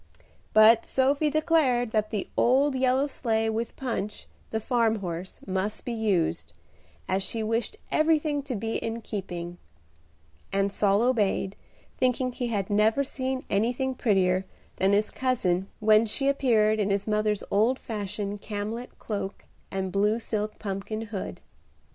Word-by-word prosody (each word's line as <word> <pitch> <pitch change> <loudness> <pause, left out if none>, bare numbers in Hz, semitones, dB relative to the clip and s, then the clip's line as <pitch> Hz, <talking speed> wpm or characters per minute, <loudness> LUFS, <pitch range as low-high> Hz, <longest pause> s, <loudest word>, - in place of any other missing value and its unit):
But 215 +1 +7
Sophie 280 +3 +2
declared 290 -6 +2
that 215 -1 +1
the 205 -3 -3
old 270 +4 +3
yellow 260 +1 +2
sleigh, 225 -5 0
with 225 +1 -3
Punch, 230 -5 -4 0.2
the 220 - -1
farm 230 -1 +2
horse, 180 -2 -5
must 190 +2 -2
be 245 - -2
used, 205 - 0 0.5
as 190 +1 +1
she 220 +3 -3
wished 230 - -1
everything 310 -2 +2
to 270 -3 -4
be 225 +2 -2
in 225 +1 -4
keeping; 175 -5 -5 0.9
and 195 0 +1
Saul 200 +2 +2
obeyed, 210 -5 +1 0.4
thinking 255 0 +1
he 245 0 -3
had 205 -4 -2
never 215 +6 +3
seen 260 -1 -3
anything 245 +6 0
prettier 190 -6 +2 0.3
than 190 +1 +3
his 210 +1 +2
cousin 195 -8 0
when 215 +1 +5
she 275 +6 0
appeared 220 -6 +3
in 205 -1 +1
his 200 0 0
mother's 210 -1 0
old 225 +6 +3
fashioned 205 -2 -4
camlet 215 +4 -5
cloak 205 -2 -5 0.2
and 190 -1 -3
blue 210 +3 +2
silk 215 -2 -3
pumpkin 200 +2 -4
hood. 210 -3 -6
220 Hz, 140 wpm, -27 LUFS, 200-250 Hz, 0.9 s, But